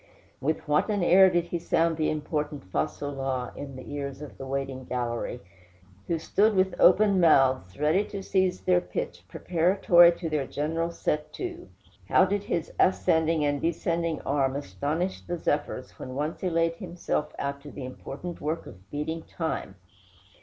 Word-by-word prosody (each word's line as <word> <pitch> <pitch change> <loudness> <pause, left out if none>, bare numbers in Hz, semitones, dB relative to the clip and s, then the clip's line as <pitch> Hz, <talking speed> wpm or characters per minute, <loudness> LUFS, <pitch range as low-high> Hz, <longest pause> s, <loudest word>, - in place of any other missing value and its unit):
With 155 +4 -2
what 150 +7 +2
an 205 -3 +1
air 190 +2 +7
did 175 -1 +1
he 170 - -2
sound 165 0 +1
the 155 -1 0
important 150 -1 -3
fa - - +1
sol 145 0 -6
la 135 -2 -2
in 140 -2 -7
the 130 - -9
ears 140 -2 -4
of 150 - -10
the 135 - -6
waiting 135 -1 -3
gallery, 120 -1 -3 0.7
who 170 - 0
stood 210 +6 +2
with 190 0 +2
open 200 +1 +6
mouths 130 - +4
ready 155 +7 +3
to 200 -1 -6
seize 190 -1 +1
their 180 -1 +3
pitch, 485 - -5
preparatory 175 0 +4
to 170 0 -5
their 150 -4 -1
general 165 +3 -1
set 150 -2 -2
to! 355 -1 -6 0.4
How 190 - +6
did 200 +1 -1
his 170 -4 -2
ascending 160 -3 +3
and 145 -1 0
descending 170 -1 -1
arm 135 -1 0
astonish 145 - -2
the 175 - -4
zephyrs 145 -5 -2
when 130 - -7
once 150 +3 -3
he 185 - 0
laid 165 0 +1
himself 175 -4 -3
out 140 0 -3
to 145 - -10
the 135 - -7
important 140 +6 -7
work 155 +3 -2
of 95 +2 -14
beating 160 +3 -3
time! 160 - -4
160 Hz, 170 wpm, -27 LUFS, 140-175 Hz, 0.7 s, air